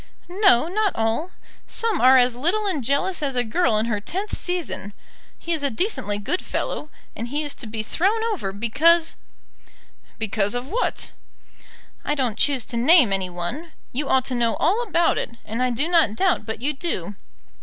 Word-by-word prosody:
"No, 355 - +4
not 410 +3 0
all. 225 +10 -1 0.4
Some 450 -6 0
are 260 +1 +7
as 245 -1 +3
little 350 - 0
and 320 -10 -1
jealous 280 +8 0
as 275 -3 -1
a 245 - +2
girl 235 0 +1
in 215 - +1
her 210 -3 -2
tenth 385 - -4
season. 345 - -3 0.4
He 340 - -3
is 315 - -2
a 280 - +1
decently 220 - -2
good 275 - -2
fellow, 300 - -4 0.3
and 230 - -5
he 290 +5 -2
is 290 -1 -3
to 255 - -8
be 215 0 -4
thrown 395 - 0
over, 195 - -4
because 305 - +3 0.5
" - - -31
"Because 205 +1 0
of 245 +2 -4
what?" 470 +7 -2 0.9
"I 295 - -1
don't 250 -6 -1
choose 270 -5 +2
to 235 - -4
name 255 - +5
any 190 -1 -1
one. 180 - -5 0.2
You 275 +3 -3
ought 260 -1 +3
to 260 - -1
know 235 -2 +1
all 390 +9 +1
about 345 -7 +1
it, 235 - -6
and 225 +3 -4
I 255 - +2
do 250 +6 -1
not 330 -11 +3
doubt 360 - +1
but 220 +2 -5
you 295 +2 +1
do. 265 - -3
270 Hz, 190 wpm, -23 LUFS, 225-345 Hz, 0.9 s, are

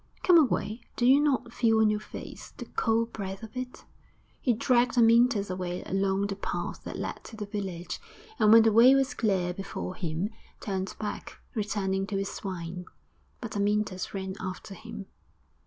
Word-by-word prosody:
Come 355 -2 +7
away! 240 -5 0
do 240 - +1
you 265 +3 +7
not 265 -5 +1
feel 225 -2 +3
on 220 -1 +5
your 210 - 0
face 215 - -10
the - - -6
cold 230 +1 0
breath 195 0 -5
of 220 +1 -10
it?' 255 0 -6 0.6
He 250 - +2
dragged 245 +2 +2
Amyntas 230 -3 +5
away 180 -1 -3
along 195 +1 0
the 200 -1 -3
path 200 - -4
that - - -5
led - - -5
to - - -10
the 215 -1 -5
village, 195 -4 -5 0.4
and 215 - +5
when 225 0 +9
the 225 - +4
way 240 +5 +7
was 270 +1 +2
clear 190 -8 0
before 195 -1 -5
him, 180 +2 -3 0.3
turned 190 -2 -3
back, 210 -1 -5 0.2
returning 195 -3 -1
to 200 - -2
his 195 0 -2
swine. 180 -2 -5 0.6
But 230 -3 -6
Amyntas 205 -2 0
ran 190 -1 -4
after 185 +1 -6
him. 215 -1 -8
210 Hz, 170 wpm, -28 LUFS, 190-230 Hz, 0.6 s, when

